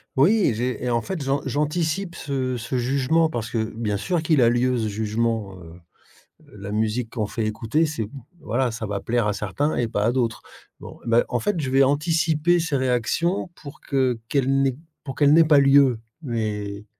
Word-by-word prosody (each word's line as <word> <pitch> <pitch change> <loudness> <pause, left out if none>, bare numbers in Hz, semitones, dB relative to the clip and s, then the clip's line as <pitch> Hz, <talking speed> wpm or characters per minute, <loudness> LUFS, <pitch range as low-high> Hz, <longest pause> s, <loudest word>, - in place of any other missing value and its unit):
Oui, 175 - +4
j'ai 125 +2 -2
et 125 - -1
en 120 -1 +1
fait, 190 0 -5
j'an 140 +1 0
j'anticipe 160 +6 -1
ce 130 -3 -3
ce 120 +3 -3
jugement 140 +6 +1
parce 115 -7 -4
que, 110 -1 -2
bien 105 -3 -2
sûr 170 - -1
qu'il 155 -4 +3
a 115 - +5
lieu 125 +1 +1
ce 110 -2 -1
jugement, 110 0 -2
heu 85 - -12
heu, 85 +2 -14 0.8
la 100 0 -7
musique 110 +2 -1
qu'on 110 -4 -2
fait 110 +1 -3
écouter 115 +9 0
c'est, 150 -9 -3 0.3
voilà, 130 -4 -1
ça 110 -1 -5
va 100 -1 -3
plaire 120 0 0
à 105 - 0
certains 105 +10 -2
et 120 -2 0
pas 105 -2 -1
à 115 - +3
d'autres, 120 -3 -1 0.4
bon. - - -11
Bah 115 +1 +3
en 120 - 0
fait, 205 +1 -1
je 135 - -3
vais 135 +1 +4
anticiper 160 +3 +2
ces 165 -3 -1
réactions 130 - 0
pour 145 -3 -12
que 130 -4 0
qu'elles 135 -2 +1
n'aient 135 -2 +1 0.3
pour 135 - -6
qu'elle 145 -1 +4
n'aient 165 +1 +7
pas 150 -2 +5
lieu 135 -3 +5 0.2
mais 105 -5 -3
125 Hz, 200 wpm, -23 LUFS, 110-150 Hz, 0.8 s, n'aient